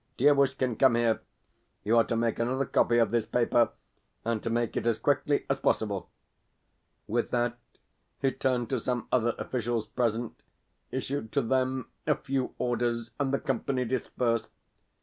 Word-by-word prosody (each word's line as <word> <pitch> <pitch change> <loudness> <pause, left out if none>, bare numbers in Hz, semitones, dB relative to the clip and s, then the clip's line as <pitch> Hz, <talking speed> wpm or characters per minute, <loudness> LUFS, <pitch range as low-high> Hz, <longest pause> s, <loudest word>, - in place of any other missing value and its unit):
Dievushkin, 135 -3 +3
come 130 -3 +6
here. 115 -1 +2 0.6
You 110 +3 +2
are 115 - +7
to 115 - -1
make 115 0 0
another 130 +3 0
copy 120 -1 +3
of 115 -1 +3
this 115 -2 +1
paper, 120 -1 +3 0.6
and 115 -2 0
to - - -3
make 120 0 0
it - - -1
as 115 -2 +2
quickly 145 +2 +1
as - - 0
possible." - - 0 1.0
With 120 +2 -1
that 120 0 0 0.6
he 135 -1 +2
turned 125 -3 0
to 130 - +1
some 120 +1 -2
other 120 -2 +2
officials 120 -3 -2
present, 115 0 -2 0.5
issued 130 -3 -3
to 140 - +2
them 130 +1 0 0.2
a 150 - +4
few 135 -1 -2
orders, 120 -1 -1
and 135 -2 +1
the 140 - +1
company 130 0 -1
dispersed. 115 -2 -1
120 Hz, 155 wpm, -29 LUFS, 115-130 Hz, 1.0 s, are